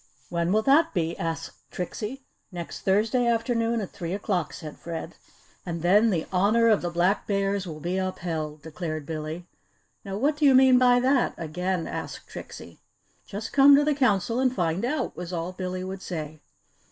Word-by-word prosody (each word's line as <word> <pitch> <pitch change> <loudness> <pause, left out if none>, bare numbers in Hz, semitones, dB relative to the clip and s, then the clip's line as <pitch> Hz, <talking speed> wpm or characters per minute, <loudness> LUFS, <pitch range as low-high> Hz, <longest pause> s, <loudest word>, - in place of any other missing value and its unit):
"When 170 0 0
will 215 +2 +3
that 295 +2 +4
be?" 170 -1 0
asked 165 0 -4
Trixie. 215 +8 -5 0.3
"Next 175 -2 -6
Thursday 220 +5 +2
afternoon 230 0 +1
at 195 - -6
three 170 0 -5
o'clock," 190 -5 -1
said 155 -2 -9
Fred. 165 0 -6 0.5
"And 170 -2 -5
then 205 +6 +5
the 170 -6 0
Honour 215 +5 +4
of 215 - +4
the 175 - -2
Black 175 +4 +1
Bears 195 -1 0
will 155 -2 -7
be 175 +4 -2
upheld!" 160 -5 -4
declared 155 -1 -5
Billy. 155 +2 -5 0.6
"Now 195 0 -5
what 290 +6 +1
do 300 - +2
you 270 -2 +7
mean 260 -1 +7
by 245 -1 +5
that," 255 0 +2
again 180 +2 -2
asked - - -6
Trixie. - - -10 0.5
"Just 210 +2 -6
come 280 0 +8
to 290 - +4
the 300 - +3
Council 230 -4 +1
and 260 -1 +3
find 175 -3 -1
out," 255 +1 -1
was 180 0 -6
all 170 0 -3
Billy 185 0 -4
would 190 0 -6
say. 155 -4 -6
190 Hz, 175 wpm, -26 LUFS, 170-230 Hz, 0.6 s, come